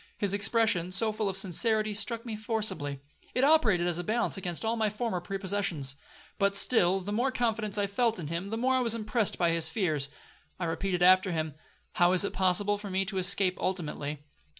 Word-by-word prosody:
This 200 -1 0
expression, 200 -3 +2
so 215 +4 +1
full 215 -1 -2
of 190 - -2
sincerity, 215 +3 +2
struck 220 +3 -2
me 225 -2 -5
forcibly. 210 - -1 0.3
It 255 - +1
operated 240 - +3
as 175 -1 -1
a - - -3
balance 230 +6 -1
against 180 +1 -4
all 225 +1 0
my 220 -2 0
former 210 -3 -3
prepossessions. 190 -7 -2 0.4
But 200 0 +1
still 195 -3 +3
the 200 +3 -6
more 250 +5 0
confidence 225 -4 -1
I 205 - +1
felt 225 +3 -1
in 170 - -6
him, 170 +6 -5
the 225 - -3
more 255 +3 +1
I 260 - +2
was 230 -2 0
impressed 220 -1 0
by 170 -2 +1
his 165 -1 +4
fears. 155 -7 -1 0.5
I 175 - -2
repeated 175 +2 -2
after 185 +1 +5
him, 160 -2 -3 0.4
'How 175 +1 +2
is 185 +2 +4
it - - -4
possible 200 +2 +1
for 205 -1 -8
me 190 +1 -1
to 195 -1 -3
escape 185 0 +4
ultimately? 150 -5 -4
200 Hz, 200 wpm, -28 LUFS, 175-220 Hz, 0.5 s, after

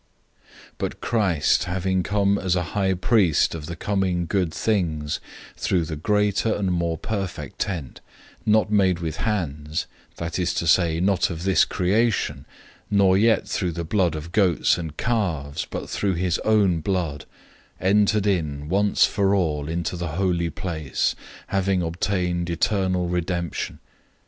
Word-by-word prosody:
009:011 - - -34 0.3
But - - -3
Christ 95 -10 +2
having 95 +1 0
come 100 +1 +1
as 95 -2 0
a 90 - 0
high 95 -2 +1
priest 90 -4 +3
of 80 -2 -6
the 85 - -5
coming 95 -1 0
good 90 -1 0
things, 80 -8 -1 0.4
through 85 -3 +1
the 80 -1 -4
greater 105 +5 +1
and 95 -2 -1
more 85 -2 0
perfect 100 0 -5
tabernacle, 90 -9 -4 0.4
not 105 0 +3
made 95 -4 +3
with 80 -2 -4
hands, 80 -8 -2 0.3
that 85 +2 -4
is 90 -1 0
to - - -1
say, 85 -1 +3
not 95 0 +2
of 85 -1 -5
this 95 0 +4
creation, 95 - 0 0.4
009:012 100 - +2
nor 95 -2 +5
yet 110 +3 +3
through 90 -4 -1
the 85 +1 -3
blood 85 -1 +1
of 80 +2 -7
goats 95 -5 +3
and 80 -3 -6
calves, 80 -11 -1
but - - -5
through 100 -3 -1
his 90 0 0
own 100 -6 +3
blood, 80 -4 -2 0.5
entered 105 +1 +3
in 75 -7 -1
once 100 +3 +3
for 100 0 +1
all 75 -6 0
into 85 +1 -2
the 85 -2 -4
Holy 90 -3 +1
Place, 80 -6 -2 0.3
having 95 -2 +1
obtained 90 0 -1
eternal 90 +1 0
redemption. 85 -1 -2
90 Hz, 150 wpm, -24 LUFS, 85-100 Hz, 0.5 s, nor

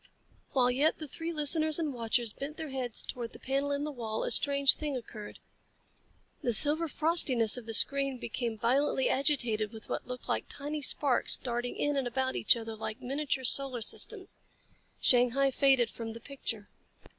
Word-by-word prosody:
While 250 -2 +3
yet 285 +5 +1
the 310 - -8
three 325 +4 -6
listeners 310 0 +3
and 310 -4 -2
watchers 230 -1 -1
bent 290 +3 -7
their 315 -2 -6
heads 255 -4 -3
toward 240 -3 -6
the - - -12
panel 275 +2 -2
in 285 0 -2
the 300 - -4
wall, 225 -5 -5
a - - -3
strange 280 -1 +3
thing 295 -3 -4
occurred. 215 -3 -10 1.0
The 240 - 0
silver 300 +8 +5
frostiness 285 - +5
of 245 -3 -7
the 225 - -5
screen 275 +1 +4
became 235 -1 -4
violently 265 +4 +1
agitated 240 -7 0
with 220 -2 -12
what - - -4
looked 250 0 -8
like - - -2
tiny 295 +1 -6
sparks 275 -3 +1
darting 245 -1 -4
in 290 0 -1
and 265 -2 -1
about 260 +2 -2
each - - +3
other 225 -1 -7
like 220 +2 -6
miniature 270 +1 -3
solar 255 -2 +2
systems. - - -2 0.6
Shanghai 250 +2 +3
faded 265 -3 +2
from 225 -1 -7
the 230 - -10
picture. 230 -5 -6
260 Hz, 175 wpm, -30 LUFS, 235-285 Hz, 1.0 s, silver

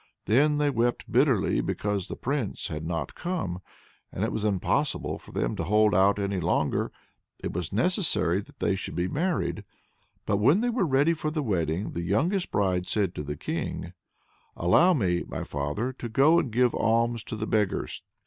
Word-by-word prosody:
Then 145 +8 +3
they 145 -1 +2
wept 120 -1 -1
bitterly - - +3
because 105 -3 -2
the - - -5
Prince 135 -5 -3
had 80 0 -4
not 85 -1 -3
come, 160 - -3 0.5
and - - -3
it - - 0
was 110 - -3
impossible 100 -4 0
for - - -15
them - - -1
to - - -1
hold 105 +4 +3
out 95 +3 +4
any 100 -1 -1
longer, 85 - 0 0.5
it - - -3
was 90 -1 -3
necessary 105 - +1
that - - -18
they - - +1
should 95 - -5
be 90 +1 0
married. 170 - -1 0.6
But 100 - +1
when 140 - +4
they 245 0 +1
were 230 -7 +1
ready 145 +4 +3
for 155 -1 -2
the 155 -1 -2
wedding, 90 - -1
the 85 - -4
youngest 165 - 0
bride 90 -3 0
said 100 -4 0
to - - -5
the 75 0 -5
King: 85 - -4 0.6
"Allow 170 - +5
me, 90 -8 +1
my - - -4
father, 75 - -3
to 120 -2 -7
go 145 +9 +5
and 135 - -2
give 125 +1 +3
alms 115 0 +1
to - - -5
the 110 0 -3
beggars." 105 -3 -1
105 Hz, 185 wpm, -27 LUFS, 90-140 Hz, 0.6 s, Allow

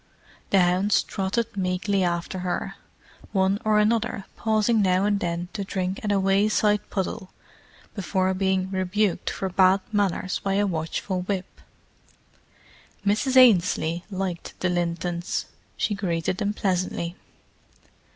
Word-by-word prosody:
The 195 - +4
hounds 180 +3 +3
trotted 210 +4 -2
meekly 190 +1 0
after 175 +1 -2
her, 180 -1 -3 0.6
one 190 0 +2
or 215 -1 +3
another 215 -1 +1
pausing 220 0 +2
now 185 0 +3
and 205 -1 +1
then 175 0 -3
to 200 - -3
drink 190 -1 -3
at 210 - 0
a 200 - +3
wayside 205 +2 +2
puddle 190 -1 -3 0.6
before 190 -1 0
being 190 0 0
rebuked 190 +1 0
for 190 - -3
bad 185 +1 +4
manners 195 -3 0
by 195 -1 -1
a 205 +1 +2
watchful 180 +1 -2
whip. 185 0 -4 1.4
Mrs. 220 +6 +1
Ainslie 180 -7 +4
liked 185 -3 -4
the 180 - 0
Lintons; 175 0 -2 0.3
she 210 - 0
greeted 180 -3 -1
them 205 +1 -1
pleasantly. 185 -3 -1
190 Hz, 125 wpm, -25 LUFS, 180-205 Hz, 1.4 s, The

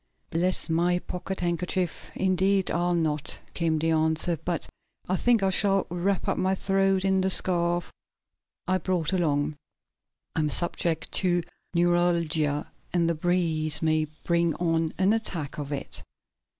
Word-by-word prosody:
"Bless 180 +3 0
my 175 +2 +2
pocket 180 +1 -5
handkerchief, 175 0 -2
indeed 190 +1 +2
I'll 175 +1 +1
not," 155 -3 -1 0.2
came 165 -2 0
the 165 +1 +1
answer. 160 +2 +1
"But 170 +2 -3 0.4
I 185 - +1
think 230 +1 +2
I 190 - +3
shall 195 0 +3
wrap 180 +2 -1
up - - 0
my 190 +1 +1
throat 195 0 +1
in 190 -1 +3
the 190 - +1
scarf 175 -2 +1 0.7
I 185 0 +2
brought 180 -1 -1
along. 150 -4 0 0.8
I - - 0
am 150 -1 +1
subject 170 0 0
to 175 -2 +2 0.3
neuralgia, 170 -4 +1 0.2
and 170 -2 +2
the 170 - +2
breeze 160 -2 0
may 155 -1 +2 0.2
bring 170 -2 +1
on 165 -2 0
an 190 +3 +3
attack 170 -11 -1
of 145 0 -5
it." 140 - -3
175 Hz, 145 wpm, -26 LUFS, 160-185 Hz, 0.8 s, I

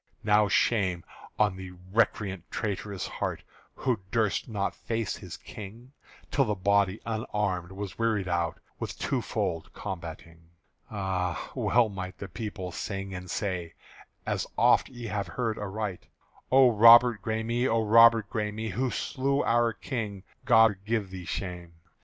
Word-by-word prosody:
(Now 105 0 +4
shame 95 -4 +2 0.3
on 105 -3 +2
the 95 -1 -8 0.2
recreant 105 -4 0
traitor's 100 -2 -3
heart - - -4 0.3
Who 125 -5 0
durst 110 +1 0
not 100 -3 -1
face 115 -3 -3
his - - -9
King 110 +5 -10 0.4
Till 135 - +3
the 105 -2 -1
body 100 +1 +2
unarmed 105 -5 -2
was 100 0 -7
wearied 110 -4 +1
out 85 -2 -1 0.2
With - - -5
two - - -1
fold 80 -1 -3
combating! 85 -3 -8 0.4
Ah! 95 -4 -2
well 120 -2 +3
might 95 -3 -6
the 100 - -6
people 100 -5 -6
sing 95 +1 -5
and 90 0 -7
say, 90 -5 -3 0.5
As - - -1
oft - - +4
ye 120 -2 -9
have 100 -3 -2
heard 110 +4 -2
aright: 105 -1 -4 0.4
"_O 130 -1 +7
Robert 115 0 +8
Græme, 115 +4 0
O 115 -2 +2
Robert 115 0 +7
Græme, 110 0 -3
Who 130 +7 0
slew 140 +3 -1
our 120 0 +3
King, 105 -4 -5 0.2
God 110 -3 +6
give 105 -3 -1
thee 95 -2 -7
shame! 90 -2 -5
105 Hz, 140 wpm, -28 LUFS, 95-115 Hz, 0.5 s, Robert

